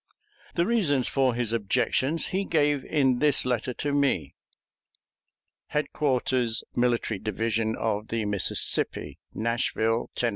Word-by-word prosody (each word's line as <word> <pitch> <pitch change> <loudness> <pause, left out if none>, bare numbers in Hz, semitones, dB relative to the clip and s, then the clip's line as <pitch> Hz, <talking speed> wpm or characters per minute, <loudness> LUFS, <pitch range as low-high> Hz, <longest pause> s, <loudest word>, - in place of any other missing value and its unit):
The 170 - +2
reasons 170 - +2
for 130 -3 +1
his 120 -2 -2
objections 130 +7 0
he 195 +2 +1
gave 145 -6 +1
in 130 -5 +1
this 145 -3 +3
letter 125 0 -1
to 145 - -2
me: 140 -1 0 1.4
HEADQUARTERS 130 -5 0
MILITARY 120 -4 0
DIVISION 110 +1 -1
OF 110 -1 -2
THE 115 -2 -2
MISSISSIPPI, 100 -2 +1 0.2
NASHVILLE, 115 0 -1
TENN. 120 - +1
125 Hz, 115 wpm, -26 LUFS, 115-145 Hz, 1.4 s, this